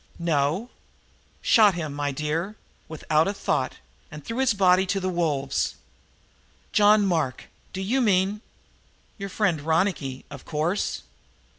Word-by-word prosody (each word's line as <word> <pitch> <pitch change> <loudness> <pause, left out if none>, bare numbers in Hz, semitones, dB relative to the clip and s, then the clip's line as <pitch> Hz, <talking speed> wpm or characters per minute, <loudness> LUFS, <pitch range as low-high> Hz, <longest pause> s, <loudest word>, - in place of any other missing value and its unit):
"No." 170 - 0 0.7
"Shot 210 -5 +5
him, 155 -4 -4
my 145 0 -2
dear, 155 +8 -3 0.3
without 155 0 +1
a 200 - -2
thought 130 -8 -1 0.3
and 150 -2 -10
threw 230 +3 -4
his 260 -5 +2
body 190 -1 +4
to 195 +1 0
the 185 0 -2
wolves!" 150 -6 -1 1.0
"John 210 0 +5
Mark! 160 -9 -1 0.2
Do 190 - -5
you 250 +7 +1
mean 200 -1 +2 0.4
" - - -36
"Your 195 0 -5
friend 180 -6 0
Ronicky, 160 -4 -1
of 140 -3 -9
course." 165 +6 -2
175 Hz, 135 wpm, -25 LUFS, 150-200 Hz, 1.0 s, Shot